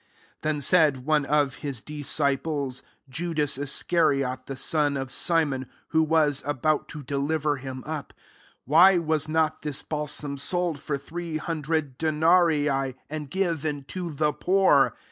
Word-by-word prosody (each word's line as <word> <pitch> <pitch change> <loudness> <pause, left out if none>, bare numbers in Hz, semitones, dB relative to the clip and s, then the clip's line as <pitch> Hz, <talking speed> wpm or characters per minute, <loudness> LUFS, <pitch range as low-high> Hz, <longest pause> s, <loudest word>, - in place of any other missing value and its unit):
4 155 - 0
Then 150 - -4
said 145 -5 +3
one 155 -1 +2
of 145 -3 +1
his 140 -5 -3
dis 150 +2 -8
ciples, 140 -2 0 0.3
Judas 150 -1 -1
Iscariot, 140 -3 0
rthe 135 - -5
son 145 -2 +1
of 135 -1 -5
Simon,] 145 -7 0 0.2
who 160 - +3
was 155 -3 +2
about 145 +2 0
to 150 -2 -8
deliver 145 +2 -1
him 130 -1 -7
up, 155 -2 -5
5 - - -35 0.2
" - - -31
Why 175 +7 +6
was 160 -2 0
not 160 -1 +1
this 150 -2 -4
balsam 150 -2 -3
sold 175 0 0
for 140 0 -3
three 165 +3 -5
hundred 155 -4 -2
denarii,* 155 -4 +2 0.2
and 155 -2 -5
given 160 -5 -1
to 180 -2 -4
the 150 0 0
poor?" 185 -7 +3
150 Hz, 150 wpm, -26 LUFS, 140-160 Hz, 0.3 s, Why